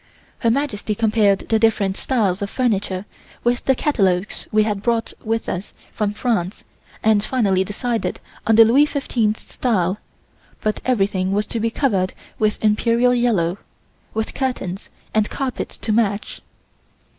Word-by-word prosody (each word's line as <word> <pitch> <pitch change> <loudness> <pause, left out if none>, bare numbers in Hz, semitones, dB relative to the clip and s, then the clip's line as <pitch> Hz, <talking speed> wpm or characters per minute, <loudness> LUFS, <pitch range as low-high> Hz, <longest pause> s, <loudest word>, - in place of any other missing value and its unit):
Her 230 - +2
Majesty 225 -5 -1
compared 215 -3 +2
the 225 - +3
different 210 -4 +2
styles 205 -8 0
of 200 - -2
furniture 200 -6 -1 0.4
with 240 +1 +1
the 265 - +4
catalogues 195 -9 0
we 215 0 +4
had 210 -2 -1
brought 230 +1 0
with 225 0 -1
us 185 +3 -4 0.2
from 210 -2 0
France 210 -6 -1 0.4
and 215 -2 +4
finally 200 -7 +2
decided 225 +4 -2 0.3
on 225 - +5
the 225 0 +9
Louis 275 +7 +5
Fifteenth 235 -7 0
style, 200 -5 0 0.6
but 215 0 -1
everything 195 -6 +1
was 210 +1 +1
to 230 - -1
be 230 +1 +1
covered 200 -8 0 0.3
with 215 0 +1
Imperial 230 +3 +3
Yellow, 200 -7 +1 0.6
with 220 0 -2
curtains 205 -8 -3 0.2
and 215 -1 +2
carpets 270 -3 -4
to 220 - -3
match. 210 -2 0
215 Hz, 145 wpm, -21 LUFS, 200-235 Hz, 0.6 s, the